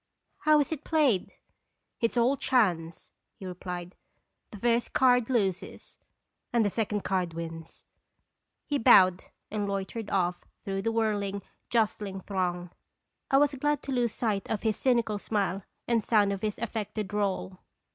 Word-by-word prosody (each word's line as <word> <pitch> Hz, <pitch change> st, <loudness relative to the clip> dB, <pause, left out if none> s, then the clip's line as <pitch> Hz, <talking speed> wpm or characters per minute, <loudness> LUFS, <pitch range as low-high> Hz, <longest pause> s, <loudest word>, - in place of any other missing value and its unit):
How 305 Hz, -1 st, +5 dB
is 285 Hz, -, -2 dB
it 315 Hz, -, -4 dB
played?" 285 Hz, -, +2 dB, 0.7 s
"It 230 Hz, -, +2 dB
is -, -, -6 dB
all 245 Hz, +4 st, +4 dB
chance," 180 Hz, -12 st, 0 dB, 0.2 s
he 195 Hz, -, -10 dB
replied; 180 Hz, 0 st, -6 dB, 0.6 s
"the 210 Hz, -, -10 dB
first 235 Hz, +3 st, +1 dB
card 250 Hz, -2 st, +4 dB
loses, 195 Hz, -8 st, -2 dB, 0.5 s
and 235 Hz, -2 st, +3 dB
the 205 Hz, -, +1 dB
second 210 Hz, -1 st, -1 dB
card 180 Hz, -4 st, -1 dB
wins." 165 Hz, -1 st, -7 dB, 0.8 s
He 290 Hz, -2 st, -1 dB
bowed 185 Hz, -4 st, +6 dB, 0.3 s
and 205 Hz, -1 st, -1 dB
loitered 200 Hz, +2 st, -4 dB
off 180 Hz, -2 st, 0 dB, 0.2 s
through 195 Hz, 0 st, -2 dB
the 225 Hz, -, 0 dB
whirling, 205 Hz, -3 st, -1 dB, 0.3 s
jostling 210 Hz, -4 st, 0 dB
throng. 180 Hz, -2 st, -2 dB, 0.6 s
I 270 Hz, -, +5 dB
was 290 Hz, 0 st, +4 dB
glad 295 Hz, +1 st, 0 dB
to 275 Hz, -, -5 dB
lose 245 Hz, -3 st, +1 dB
sight 210 Hz, -3 st, -2 dB
of 215 Hz, -, -2 dB
his 220 Hz, -2 st, +1 dB
cynical 235 Hz, -5 st, +1 dB
smile 195 Hz, -2 st, -1 dB, 0.2 s
and 230 Hz, -2 st, +2 dB
sound 205 Hz, -3 st, +3 dB
of 195 Hz, -, -5 dB
his 210 Hz, -1 st, -2 dB
affected 215 Hz, -2 st, -3 dB
drawl. 195 Hz, -2 st, -2 dB
210 Hz, 150 wpm, -28 LUFS, 190-235 Hz, 0.8 s, bowed